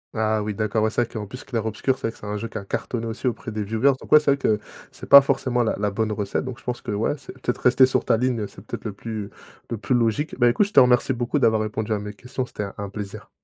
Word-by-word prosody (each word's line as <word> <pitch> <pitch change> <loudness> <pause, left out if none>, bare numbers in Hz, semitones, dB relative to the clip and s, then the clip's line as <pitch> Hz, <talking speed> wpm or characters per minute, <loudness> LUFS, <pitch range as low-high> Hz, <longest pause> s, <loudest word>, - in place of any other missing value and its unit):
Ah 110 -1 +1
oui, 105 0 -3
d'accord. 110 +1 0
Ouais, 110 - +3
c'est 120 - +1
vrai 115 - -9
qu'en 105 -2 -5
plus 125 +6 -9
Clair 115 -5 -3
Obscur, 120 +4 0
c'est 135 - -18
vrai - - -3
que - - -19
c'est - - -11
un 105 0 -3
jeu 115 - -4
qui - - -7
a 100 - -6
cartonné 115 +3 -3
aussi 115 +3 -3
auprès 120 -1 -3
des 105 -1 -3
viewers 110 +7 +2
donc - - -13
ouais, 150 - +9
c'est 150 -2 +2
vrai 140 - +2
que 110 -5 +1 0.3
c'est - - -11
pas 140 - +11
forcément 130 -2 0
la 115 - +1
la 105 0 0
bonne 110 +2 -1
recette. 105 -2 -2
Donc 130 -2 -6
je - - -18
pense 125 -1 -4
que - - -9
ouais, 105 +6 0
c'est - - -11
peut-être 125 -1 -3
rester 130 +1 +6
sur 130 - 0
ta - - +3
ligne, 120 -3 0
c'est 95 - -15
peut-être - - -7
le 105 - -3
plus 105 0 -6 0.4
le 115 - -3
plus 110 +5 -1
logique. 120 +5 +1
Bah, 120 -1 +6
écoute, 125 +12 +3
je 205 - -8
te - - +8
remercie 125 0 +4
beaucoup 120 +4 -1
d'avoir 110 -5 +3
répondu 110 0 -2
à 105 - -1
mes 105 0 -6
questions, 125 +4 -5
c'était 105 - -5
un 100 - -6
un 100 -1 -4
plaisir. 100 0 -7
115 Hz, 305 wpm, -23 LUFS, 105-125 Hz, 0.4 s, pas